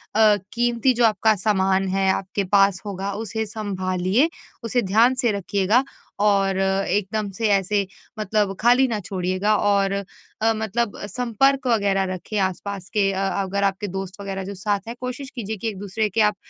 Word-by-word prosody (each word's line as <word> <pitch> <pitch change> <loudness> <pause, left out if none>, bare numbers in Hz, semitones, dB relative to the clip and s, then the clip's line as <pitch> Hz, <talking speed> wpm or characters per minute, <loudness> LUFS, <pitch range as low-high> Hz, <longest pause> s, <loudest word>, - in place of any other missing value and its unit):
अ, 215 -1 +6 0.2
कीमती 240 +2 +2
जो 240 0 +3
आपका 220 0 +3
सामान 195 -1 +1
है 190 0 +1
आपके 195 +1 -2
पास 195 -1 +4
होगा 195 0 -4
उसे 220 +1 -3
सँभालिए 195 - 0 0.3
उसे 235 +2 +1
ध्यान 225 +6 +4
से 240 - +2
रखिएगा 200 +4 +1 0.4
और 195 -2 +3
एकदम 195 +2 0
से 225 - +1
ऐसे 200 0 +2 0.3
मतलब 210 -1 0
खाली 245 +3 +5
ना 220 -3 -2
छोड़िएगा 185 +2 0
और 200 -1 +2
अ, 200 0 -3 0.5
मतलब 220 0 -2
संपर्क 255 +4 +1
वगैरह 200 -4 +2
रखें 205 +4 -5
आस-पास 190 0 -3
के 200 -2 +2
अगर 195 +1 -1
आपके 200 +1 0
दोस्त 195 +1 -6
वगैरह 195 -1 -4
जो 200 - -5
साथ 205 +1 -1
हैं, 235 - -5
कोशिश 255 +2 -5
कीजिए 220 -2 -4
कि 225 - -4
एक-दूसरे 205 +1 -2
के 220 +4 +1
आप 210 -1 +3
200 Hz, 160 wpm, -23 LUFS, 195-220 Hz, 0.5 s, अ